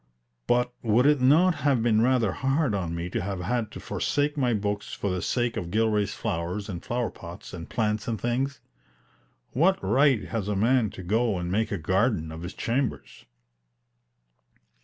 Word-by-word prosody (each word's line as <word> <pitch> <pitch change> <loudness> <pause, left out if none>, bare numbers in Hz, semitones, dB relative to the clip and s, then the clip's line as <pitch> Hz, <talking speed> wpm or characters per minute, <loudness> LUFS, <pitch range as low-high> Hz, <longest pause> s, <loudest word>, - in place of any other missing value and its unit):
But 125 0 +2
would 115 +3 +3
it 145 -2 +4
not 160 +8 +5
have 135 -5 +2
been 110 -2 +3
rather 120 -4 +3
hard 135 - 0
on 85 -4 -2
me 85 +1 -3
to 115 - -1
have 95 -1 -3
had 110 +4 -1
to - - -7
forsake 145 +1 -1
my 130 -4 +1
books 105 -1 -2
for 100 - -2
the 90 -1 -2
sake 120 +3 0
of 85 - -4
Gilray's 105 0 +1
flowers 90 +5 -3
and 90 -5 -6
flower 120 -1 -2
pots 85 0 -10
and 85 -2 -7
plants 105 -2 -1
and 115 -3 -2
things? 135 +4 -1 0.9
What 185 +9 +3
right 135 -4 +3
has 110 -4 -2
a 105 - -1
man 115 +2 +3
to 95 - -7
go 110 +2 +1
and 90 0 -3
make 110 +3 0
a 100 - -1
garden 95 0 0
of 80 +1 -8
his 90 +2 -7
chambers? 130 +4 -3
110 Hz, 180 wpm, -26 LUFS, 95-125 Hz, 0.9 s, not